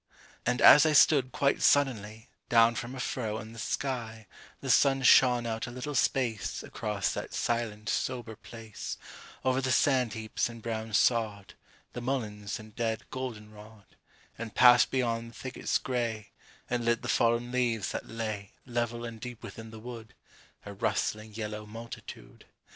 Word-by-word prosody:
And 125 0 +1
as 145 - +10
I 155 -1 +3
stood, 140 -3 +5
quite 140 +2 +1
suddenly, 110 -5 +1 0.2
Down 115 0 +5
from 120 +3 -5
a - - -7
furrow 110 -4 -2
in 110 0 -8
the 115 - -10
sky 115 -3 -3 0.3
The - - -1
sun 135 -1 +4
shone 125 -1 +6
out 115 0 -3
a - - -5
little 125 +4 -5
space 120 -6 0
Across 105 -2 -2
that - - -5
silent 115 -3 -2
sober 120 -3 -2
place, 115 -1 -8 0.5
Over 130 0 +2
the 130 0 0
sand 130 -4 +3
heaps 110 +1 -2
and 115 0 -9
brown 110 -1 -4
sod, 110 -5 +1 0.4
The 120 - -5
mulleins 110 -5 -3
and 110 -1 -13
dead 115 -2 -3
goldenrod, 110 -4 -8 0.4
And 115 -2 -6
passed 125 -1 +7
beyond 115 -3 -1
the 115 - -17
thickets 130 0 -2
gray, 115 -4 -3 0.4
And 120 -1 -1
lit 120 +1 +1
the - - -4
fallen 120 0 +2
leaves 120 -6 0
that - - -5
lay, 110 -3 -5
Level 120 -1 -2
and 115 -2 -8
deep 125 -2 -8
within 115 0 -9
the 110 - -10
wood, 115 -1 -9 0.5
A 100 - -7
rustling 110 +2 -2
yellow 105 -1 -5
multitude. 115 +2 -10
115 Hz, 160 wpm, -29 LUFS, 110-125 Hz, 0.5 s, as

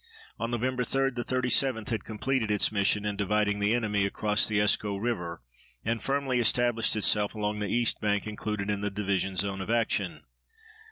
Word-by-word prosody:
On 115 - -2
Nov. 120 -2 -2
3 130 +1 +1 0.4
the 120 -2 -4
37th 130 -2 +1
had 110 -4 -2
completed 110 +1 -1
its 105 0 +2
mission 105 0 +1
in 105 -1 -1
dividing 105 0 +1
the 105 +3 +2
enemy 105 -4 0
across 105 +1 +1
the 110 - 0
Escaut 105 0 +1
River 85 - -3 0.4
and 115 0 -1
firmly 135 -2 0
established 120 0 +2
itself 105 0 +2
along 105 0 -2
the 105 - -2
east 120 -1 +1
bank 105 -1 0
included 105 -1 -3
in 100 -1 -2
the 105 - -1
division 95 -1 -1
zone 95 0 -1
of 95 - -6
action. 115 -1 0
105 Hz, 175 wpm, -28 LUFS, 100-115 Hz, 0.4 s, its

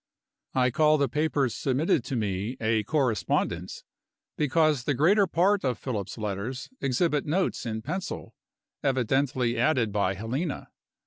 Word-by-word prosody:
I 130 -1 +3
call 155 +4 +4
the 140 -1 +2
papers 145 -2 0
submitted 135 0 +1
to 130 - -3
me 105 +2 -2
a 110 -1 +1
correspondence, 115 - -1 0.5
because 150 -3 +2
the 145 - +1
greater 195 - +4
part 190 +4 +2
of 125 -4 0
Philip's 105 -6 -4
letters 110 - -4
exhibit 150 +3 +1
notes 175 -5 0
in 110 -1 -4
pencil, 180 - -5 0.5
evidently 130 -2 +1
added 125 -5 +2
by 100 -2 0
Helena. 130 - -4
130 Hz, 130 wpm, -27 LUFS, 115-150 Hz, 0.5 s, call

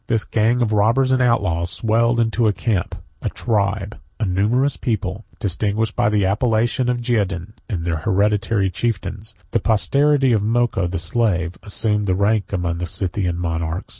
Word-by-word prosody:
This 115 -3 +1
gang 115 +3 +1
of 110 -2 0
robbers 115 +6 +3
and 130 0 +3
outlaws 95 -9 +1
swelled 115 +4 +1
into 115 0 +2
a 105 - +2
camp, 100 -4 -1 0.3
a - - -1
tribe, 105 -2 -1 0.2
a 110 - 0
numerous 110 +9 +1
people, 105 -4 -3
distinguished 105 +3 -1
by - - +2
the 105 -2 +2
appellation 115 +4 +1
of 125 - +1
Geougen; 100 -5 -1 0.2
and 85 -7 -3
their 85 -2 0
hereditary 100 +2 +1
chieftains, 110 +1 -3 0.2
the - - +2
posterity 135 +5 +2
of 110 -3 +2
Moko 110 -4 +1
the 90 - -3
slave, 90 -1 0
assumed 105 0 0
their 95 - +2
rank 100 +1 +1
among 85 -3 -2
the 90 - -3
Scythian 90 0 -2
monarchs. 80 0 -3
105 Hz, 165 wpm, -20 LUFS, 95-115 Hz, 0.3 s, robbers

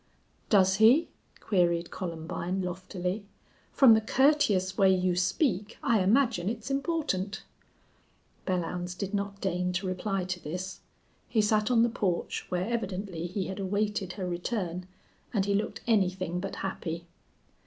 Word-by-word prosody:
"Does 190 -2 +5
he?" 235 +9 +6 0.3
queried 175 -3 +1
Columbine, 175 +2 -3
loftily. 185 +2 -4 0.4
"From 260 -5 +7
the 220 - +4
courteous 220 -8 +3
way 195 -1 +5
you 185 -1 +2
speak 205 - 0
I 230 -3 +3
imagine 220 -2 +2
it's 230 +3 -5
important." 275 - -1 1.0
Belllounds 180 -1 -2
did 200 +1 -4
not 200 0 -2
deign 180 -1 -1
to 185 +2 -2
reply 185 +1 -1
to 180 0 -3
this. 180 +4 -5 0.5
He 225 - +1
sat 215 +1 +2
on 235 -2 +5
the - - +4
porch, 205 -7 -2
where 180 0 -1
evidently 190 -6 -3
he 185 +1 -3
had 190 +1 -5
awaited 200 -1 -1
her 185 -3 -4
return, 180 0 -3 0.5
and 195 -2 +2
he 200 - +1
looked 205 +2 -1
anything 185 -5 +1
but 195 +2 -4
happy. 170 -3 -4
190 Hz, 140 wpm, -29 LUFS, 180-215 Hz, 1.0 s, From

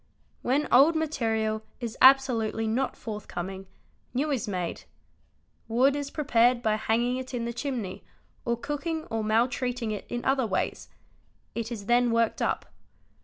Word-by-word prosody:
When 280 +4 +1
old 290 +6 +6
material 225 -8 0 0.2
is 235 -2 -4
absolutely 250 -5 +5
not 245 +5 0
forthcoming, 195 -4 -6 0.5
new 295 +4 +1
is 255 -7 -1
made: 180 -4 -3 0.8
wood 255 +5 +3
is 285 -1 -3
prepared 245 -5 +2
by 215 - +2
hanging 235 +3 +1
it 260 0 -5
in 235 -1 -2
the 235 - -3
chimney 240 -7 -4 0.4
or 235 0 0
cooking 295 +5 -3
or 225 -1 -1
maltreating 240 +1 0
it 210 - -5
in 240 0 -4
other 265 -3 +2
ways; 190 - -2 0.6
it 230 0 -4
is 210 -4 -5
then 240 +2 +3
worked 230 -1 +1
up. - - 0
240 Hz, 145 wpm, -27 LUFS, 220-265 Hz, 0.8 s, old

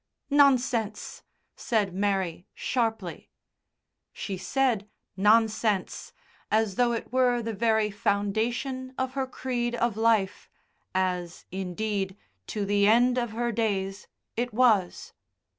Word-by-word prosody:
"Nonsense," 250 -7 +2 0.3
said 210 -6 0
Mary 190 -3 -1
sharply. 225 -7 -2 0.8
She 195 - -5
said 210 +3 0 0.3
"nonsense" 215 0 +2 0.4
as 220 -2 +2
though 240 +3 +2
it 230 - -5
were 250 -2 +3
the 225 0 -3
very 220 0 +2
foundation 230 +6 -1
of 260 0 -2
her 265 -1 -1
creed 245 -2 -2
of 235 -2 0
life 220 -3 +1 0.5
as, 180 -2 -1
indeed, 195 +1 -3 0.3
to 210 -2 -2
the 200 0 +3
end 245 +3 +4
of 240 -1 -2
her 240 +1 -1
days, 200 -4 -2 0.3
it 245 +1 -1
was. 220 -7 +2
220 Hz, 110 wpm, -27 LUFS, 195-240 Hz, 0.8 s, end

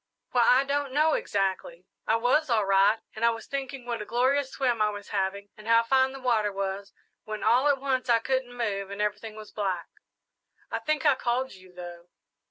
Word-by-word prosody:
"Why, 245 - +3
I 250 +3 +5
don't 280 -1 -2
know 305 +2 +3
exactly. 200 - -2 0.2
I 220 - +3
was 250 +6 +2
all 220 -4 +2
right, 195 +3 +4 0.2
and 220 - -5
I 235 - +6
was 225 -1 -4
thinking 275 -2 -5
what 235 -2 -3
a - - -5
glorious 260 +4 +1
swim 245 -5 0
I 210 - +4
was 205 -1 -8
having 200 0 -2
and 215 +1 -13
how 230 0 +5
fine 260 +2 +3
the 270 - -8
water 225 -5 +1
was, 195 0 -4 0.3
when 215 -1 -5
all 245 +6 +4
at 285 -2 +3
once 260 -2 -1
I 235 - +6
couldn't 250 +1 -2
move, 200 -4 -2
and 200 +1 -7
everything 210 +1 -2
was 215 0 -10
black. 190 -5 -3 0.8
I - - -1
think 310 0 -1
I 290 - +6
called 255 +1 -1
you, 185 -1 -16
though." 175 -1 -10
230 Hz, 205 wpm, -27 LUFS, 205-260 Hz, 0.8 s, I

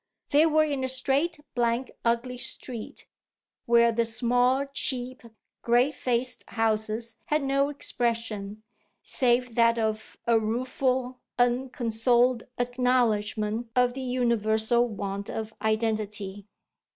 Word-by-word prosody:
They 300 +3 +5
were 310 0 +4
in 285 -3 -2
a - - 0
straight, 280 +5 0
blank, 240 +1 0
ugly 240 +2 0
street, 240 -2 -6 0.6
where 235 0 +5
the 230 +1 +1
small, 245 +4 +1
cheap, 255 -2 -1 0.4
grey 245 +4 +3
faced 250 -2 -1
houses 220 0 -1
had 300 -1 0
no 275 +1 +1
expression 225 -6 -3 0.4
save 250 -1 +1
that 230 0 +4
of 220 -1 -2
a 230 -1 +4
rueful, 255 +3 -1 0.2
unconsoled 245 -1 +2
acknowledgment 240 -3 0
of 250 -1 +3
the 265 - -5
universal 235 -2 +1
want 200 -2 -5
of 220 0 -5
identity. 215 -2 -2
240 Hz, 110 wpm, -27 LUFS, 220-255 Hz, 0.6 s, They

